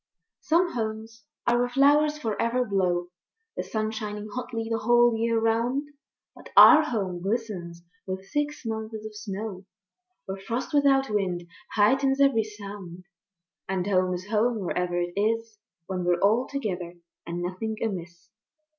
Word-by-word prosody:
Some 345 +2 +2
Homes 225 +1 -5 0.2
are 240 0 +3
where 245 0 +1
flowers 290 +3 +4
for 225 -8 -2
ever 245 +2 +1
blow, 180 -4 0 0.5
The - - -2
sun 215 -1 -2
shining 210 -1 -5
hotly 235 -3 -4
the 225 0 -1
whole 240 +1 +4
year 230 0 +1
round; 235 +6 0 0.5
But - - -13
our 310 -1 +10
Home 195 - -2
glistens 190 -5 -3 0.2
with 190 0 -4
six 295 +2 -2
months 220 0 -4
of 215 -1 -8
snow, 200 -1 -5 0.6
Where 190 0 -5
frost 235 +10 -4
without 275 -3 +3
wind 185 -4 -1 0.3
heightens 270 +6 +3
every 275 -5 +4
sound. 200 -4 -9 0.7
And 190 -2 -1
Home 185 -2 +2
is 180 +1 -7
Home 225 +1 +1
wherever 180 -1 -1
it 175 0 -2
is, 225 +1 -1 0.3
When 185 -1 -3
we're 175 0 +2
all 220 +6 +3
together 185 -10 -4 0.3
and 175 +1 -3
nothing 200 +5 -3
amiss. 175 -5 -5
220 Hz, 145 wpm, -26 LUFS, 190-240 Hz, 0.7 s, our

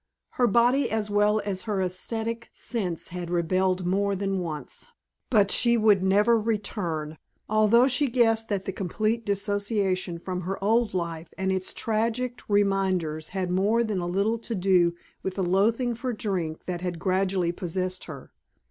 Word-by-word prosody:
Her 245 - +2
body 240 +5 +3
as 215 -1 -2
well 210 +1 +3
as 190 -2 -2
her 205 -2 0
aesthetic 225 +5 -3
sense 185 -9 -3
had 175 -1 -5
rebelled 185 +1 +1
more 200 +2 +1
than 195 0 -1
once. 160 - -5 0.4
But 205 -5 +4
she 235 0 +4
would 215 -3 +4
never 205 +5 +4
return; 190 -8 -3 0.3
although 215 +4 +4
she 275 +2 +2
guessed 225 -2 +2
that 200 -2 -2
the - - -2
complete 215 +5 -2
dissociation 200 -3 0
from 180 +1 -4
her 190 +2 -3
old 225 0 +2
life 170 -2 -4
and 190 0 0
its 190 0 -1
tragic 230 +3 -1
reminders 190 -6 +1
had 185 -2 -3
more 205 +6 +2
than 215 -4 -2
a 175 - -3
little 200 +6 0
to 230 0 -4
do 180 -3 +3 0.3
with 190 -1 -4
the 195 - -1
loathing 220 +7 +2
for 245 +2 -3
drink 185 -8 -3
that 175 -1 -4
had 180 -2 -3
gradually 185 -1 0
possessed 185 +1 -3
her. 140 -5 -10
195 Hz, 160 wpm, -26 LUFS, 180-220 Hz, 0.4 s, But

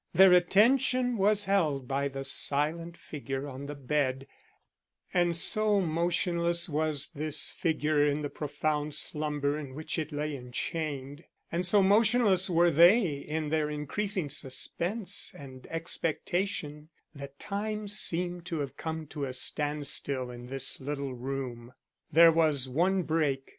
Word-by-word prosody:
Their 190 +1 +8
attention 245 +7 +3
was 205 0 +2
held 155 -10 0
by 140 +1 -1
the 135 0 -6
silent 155 +5 0
figure 135 -1 -6
on 140 +1 -8
the 145 - -6
bed, 135 -1 -1 0.9
and 175 -1 +2
so 210 +4 +3
motionless 170 0 0
was 155 -2 -1
this 150 0 -2
figure 155 -3 0
in 150 0 0
the 145 - -3
profound 150 0 -2
slumber 150 -1 -1
in 135 -3 -8
which 155 +2 -3
it 155 0 -4
lay 150 0 -3
enchained, 140 +3 -5 0.3
and 175 +2 0
so 200 +2 +4
motionless 205 -2 +3
were 170 0 +4
they 175 +6 +6
in 150 +2 -4
their 155 -1 0
increasing 170 +5 -1
suspense 170 - -1
and 130 -2 -11
expectation, 165 -1 -3 0.2
that 140 -1 -10
time 210 +3 -4
seemed 180 -3 -2
to 165 -3 -2
have 140 -2 -5
come 160 -1 -5
to 145 -1 -5
a 130 - -5
standstill 140 -2 0
in 120 0 -10
this 135 +1 -1
little 140 -1 -4
room. 125 -1 -6 0.4
There 165 +1 +7
was 155 -5 +2
one 180 +8 +1
break. 150 -5 -1
155 Hz, 135 wpm, -29 LUFS, 140-175 Hz, 0.9 s, Their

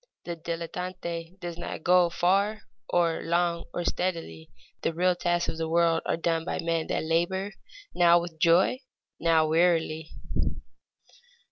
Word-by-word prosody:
The 170 - -4
dilettante 170 +1 -5
does 175 -2 -6
not 165 - -6
go 180 -1 +5
far 200 +5 +1 0.3
or 170 -2 +2
long 170 0 0
or 175 - -3
steadily; 165 - -3 0.3
the - - 0
real 180 +2 +3
tasks 175 -1 0
of 160 - -4
the 160 0 -2
world 165 0 +3
are - - +1
done 165 -1 0
by 175 - -3
men 165 -1 -1
that - - -1
labor, 175 +5 0 0.4
now 175 -1 +5
with 170 -2 -7
joy, 175 +9 +4 0.4
now 165 -1 +3
wearily. 160 -1 +2
170 Hz, 140 wpm, -27 LUFS, 165-175 Hz, 0.4 s, go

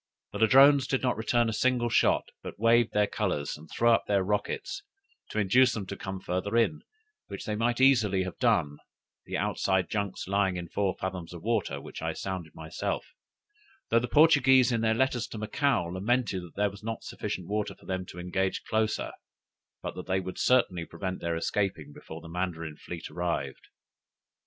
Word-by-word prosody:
The 100 - -5
Ladrones 135 +4 +6
did 135 - 0
not 125 - +2
return 115 +2 +1
a 110 - -1
single 120 +1 +1
shot, 115 - +2
but - - -8
waved 115 +1 +4
their 105 0 +3
colors, 95 -8 -2
and 75 +1 -14
threw 120 0 +3
up 115 - +3
rockets, 105 - -1 0.5
to - - -6
induce 120 +5 +4
them 105 -3 -4
to - - -6
come 95 0 -6
further 95 +5 -2
in, 120 +6 +2 0.5
which 100 - -7
they 105 - -2
might 120 +3 0
easily 110 -8 +4
have 95 - -7
done, 90 - +2 0.5
the - - -2
outside 95 -2 0
junks 100 -4 -3
lying 95 -2 +1
in 85 -1 -6
four 100 -1 0
fathoms 90 -2 -5
water, 95 -6 -1
which - - -9
I - - -2
sounded 95 -5 -5
myself: 80 0 -3 0.9
though 115 - +5
the 125 - -3
Portuguese 135 -5 +5
in 115 -1 +1
their 110 0 +2
letters 125 -1 +1
to - - -8
Macao 115 +1 +1
lamented 95 +4 -1
there 105 0 +1
was 100 - -12
not 115 +1 -5
sufficient 90 -2 -5
water 105 0 -2
for - - -20
them 95 -1 -2
to - - -11
engage 95 +2 -1
closer, 110 -1 -1 0.7
but - - -4
that 90 - -8
they 95 0 +1
would 95 0 -6
certainly 105 -9 +3
prevent 95 +3 -5
their 85 -1 -1
escaping 80 -5 -2
before 80 +2 -10
the 85 - -11
Mandarin 85 -3 -4
fleet 85 +2 -8
arrived! 85 -6 -3
100 Hz, 180 wpm, -28 LUFS, 90-115 Hz, 0.9 s, Ladrones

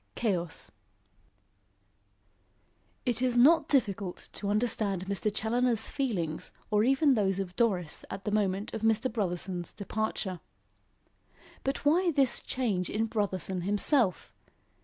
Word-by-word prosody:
CHAOS 180 -8 -2 2.3
It 245 -1 0
is 250 -1 +1
not 310 +7 +6
difficult 200 -9 0
to 200 - -4
understand 205 -3 0
Mr. 200 +2 -1
Challoner's 230 +1 +1
feelings 185 - -2 0.2
or 210 0 +3
even 270 +3 +4
those 195 -5 +1
of 185 -2 -4
Doris 185 -9 0
at 195 0 -7
the 210 - -1
moment 205 0 0
of 220 - -4
Mr. 225 +3 +2
Brotherson's 180 -4 -3
departure. 200 -3 -3 1.2
But 270 +2 -2
why 345 +5 +4
this 275 -6 +2
change 210 -8 -1
in 225 +1 0
Brotherson 190 -4 -2
himself? 205 - +2
210 Hz, 115 wpm, -29 LUFS, 190-245 Hz, 2.3 s, not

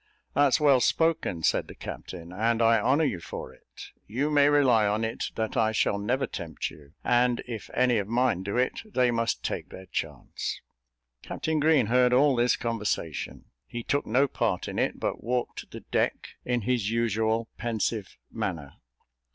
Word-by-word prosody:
"That's 140 0 +4
well 140 -4 +5
spoken," 160 - +1
said - - +2
the - - -11
captain, 85 -1 -8
"and 115 +4 +1
I 115 -1 +5
honour 135 +8 +3
you 115 - 0
for 80 - -7
it. - - -14 0.2
You 135 +8 -1
may 145 -1 +5
rely 130 -7 +4
on 105 +2 0
it 110 - -3
that 110 +3 -2
I 110 -3 +3
shall 100 -2 +1
never 125 +6 0
tempt 80 -4 -5
you, 70 -2 -16
and 120 0 +2
if 115 -4 -6
any 125 -3 +3
of 100 - -3
mine 120 -4 +1
do 100 +4 -3
it, 125 +1 +1
they 130 - +1
must 115 0 -1
take - - -3
their 95 - -10
chance." - - -4 0.6
Captain 160 -1 -2
Green 150 -4 +4
heard 125 +2 +3
all 135 +1 +5
this 120 +1 +3
conversation; 105 - -3 0.2
he 120 - -6
took 145 +4 -1
no 130 +6 +3
part - - -1
in - - -3
it, - - 0
but - - -3
walked 125 +2 -2
the - - -9
deck - - -1 0.2
in 120 -1 0
his 115 -2 0
usual 115 0 0
pensive 110 -3 -2
manner. 80 -7 -4
115 Hz, 175 wpm, -27 LUFS, 105-130 Hz, 0.6 s, well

